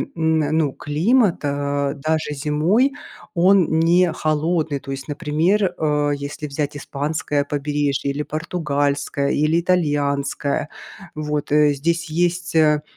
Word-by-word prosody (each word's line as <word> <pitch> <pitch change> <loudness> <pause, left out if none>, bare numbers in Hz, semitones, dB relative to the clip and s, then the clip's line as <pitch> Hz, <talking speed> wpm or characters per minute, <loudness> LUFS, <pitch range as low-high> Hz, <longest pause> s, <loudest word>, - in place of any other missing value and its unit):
м, 160 -1 +1
ну, 155 -1 +1
климат, 185 - +1
э, 140 0 -1
даже 155 +1 -1
зимой, 155 - +1 0.4
он 180 -3 +4
не 175 +1 +4
холодный. 155 -1 0
То 135 - -8
есть 135 0 -6
например, 170 +6 +1
э, 150 -1 +1
если 145 +1 -6
взять 145 0 -3
испанское 145 0 -2
побережье, 145 -1 -1
или 145 +2 -3
португальское, 145 -3 -1
или 155 +3 +2
итальянское. 145 -5 0 0.5
Вот, 150 -1 -3
э. 150 0 +4
Здесь 165 +4 -1
есть, 175 +1 -1
э, 150 -2 +4
150 Hz, 120 wpm, -21 LUFS, 145-165 Hz, 0.5 s, он